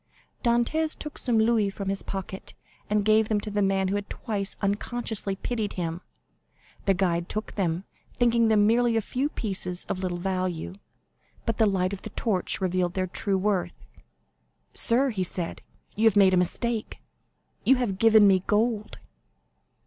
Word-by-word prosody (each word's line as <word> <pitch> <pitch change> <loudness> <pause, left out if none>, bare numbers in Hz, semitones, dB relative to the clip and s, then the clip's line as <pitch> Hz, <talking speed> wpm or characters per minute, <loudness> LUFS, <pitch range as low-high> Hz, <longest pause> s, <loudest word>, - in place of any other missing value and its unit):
Dantès 245 +7 +1
took 300 - -5
some 240 -3 +1
louis 220 -2 +3
from 195 0 -5
his 195 0 -2
pocket, 190 0 -6 0.3
and 210 -1 +1
gave 215 0 +4
them 215 -1 +2
to 210 - -5
the 205 0 0
man 195 -1 +2
who - - -1
had 205 0 -3
twice 200 -3 -3
unconsciously 205 0 -2
pitied 220 +1 -3
him. 170 -1 -3 0.9
The 195 - +4
guide 175 -1 0
took 215 +1 -3
them, 175 -3 -1 0.3
thinking 235 -1 +3
them 215 -2 +4
merely 235 +1 +3
a - - +2
few 265 +7 -1
pieces 185 -8 -2
of 185 - -3
little 180 -2 -2
value; 185 -2 -2 0.7
but 230 -2 -1
the 220 - +5
light 190 -1 0
of 195 - -6
the - - -7
torch 200 -6 -1
revealed 180 -2 0
their 185 -1 0
true 195 +2 -1
worth. 195 -1 0 1.0
"Sir," 255 +3 +2
he 190 -4 -1
said, 175 -1 -2 0.3
"you 220 - +1
have 220 -3 +5
made 195 -2 +6
a - - +4
mistake; 235 +3 -2 0.7
you 265 - +5
have 225 -7 -2
given 220 -2 +6
me 190 -2 +4
gold." 215 0 0
205 Hz, 165 wpm, -26 LUFS, 190-225 Hz, 1.0 s, made